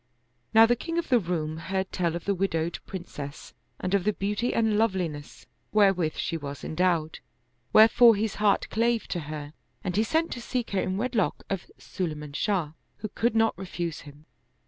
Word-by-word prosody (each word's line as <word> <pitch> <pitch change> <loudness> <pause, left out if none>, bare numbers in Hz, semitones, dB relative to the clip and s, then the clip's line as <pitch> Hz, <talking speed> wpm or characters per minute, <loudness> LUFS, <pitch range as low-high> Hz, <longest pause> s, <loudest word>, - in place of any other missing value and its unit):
Now 225 +1 +8
the 240 +1 +3
king 330 +7 -4
of 340 - -1
the 250 -2 +5
Roum 160 -4 -2
heard 190 +3 -3
tell 170 -2 0
of 170 - -6
the 200 - +2
widowed 170 -3 -1
Princess 150 -6 -7 0.3
and 185 - -2
of 200 -2 +3
the 210 - +1
beauty 210 +5 -1
and 220 -2 +2
loveliness 185 -9 -1 0.3
wherewith 195 -6 +3
she 165 - -2
was 145 -2 -7
endowed, 165 -2 0 0.5
wherefore 225 +1 +7
his 215 +1 -2
heart 205 -2 +3
clave 230 +1 +1
to 175 - -2
her 150 -1 -6 0.3
and 180 - -2
he 210 - +3
sent 320 +8 0
to 240 - -5
seek 245 0 -3
her 195 - +1
in 185 +1 -2
wedlock 230 -3 0
of 195 -2 -3
Sulayman 150 -5 -5
Shah, 180 -7 0 0.3
who 215 - -5
could 230 +3 0
not 225 0 +3
refuse 175 -3 -4
him. 145 +1 -14
190 Hz, 180 wpm, -27 LUFS, 165-220 Hz, 0.5 s, Now